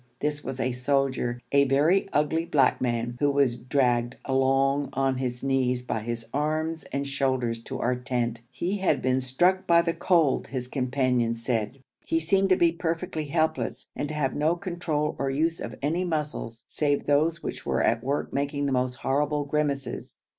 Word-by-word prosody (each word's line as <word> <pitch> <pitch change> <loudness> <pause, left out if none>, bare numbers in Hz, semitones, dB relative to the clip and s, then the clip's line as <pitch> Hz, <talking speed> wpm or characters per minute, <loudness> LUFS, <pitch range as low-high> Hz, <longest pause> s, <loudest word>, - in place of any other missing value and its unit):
This 150 0 -2
was 130 0 -5
a 130 - 0
soldier, 125 -1 0
a 140 0 +5
very 155 +9 +3
ugly 150 +3 +1
black 140 -6 +2
man, 120 -1 -1
who 145 - +3
was 140 -4 +2
dragged 120 -1 +1
along 135 +1 +2
on 135 0 +1
his 125 -1 -3
knees 130 -2 +1
by 120 - -2
his 115 +1 -5
arms 155 +2 -1
and 140 0 -2
shoulders 130 -4 0
to - - -5
our 125 +1 +1
tent. 120 -2 -2
He 175 +10 -2
had 190 - +2
been 130 +1 +2
struck 175 +9 +2
by 170 -1 +5
the 170 -1 0
cold, 165 -8 +2
his 125 -2 -4
companions 125 -3 0
said. 120 +2 -2 0.2
He 165 - +1
seemed 195 +4 +2
to 185 - +6
be 170 -2 +4
perfectly 165 -1 -3
helpless, 160 +2 -1
and 145 - -3
to 155 - -4
have 140 -3 0
no 155 +3 +2
control 170 -5 -2
or 135 - 0
use 160 +5 0
of - - -5
any 165 +5 +1
muscles 150 -9 -3
save 145 -2 0
those 155 +4 +2
which - - -5
were - - 0
at 115 -1 +2
work 140 +3 -2
making 145 +1 -1
the 140 - 0
most 125 -1 0
horrible 145 +3 0
grimaces. 140 -2 -2
140 Hz, 180 wpm, -26 LUFS, 125-155 Hz, 0.2 s, to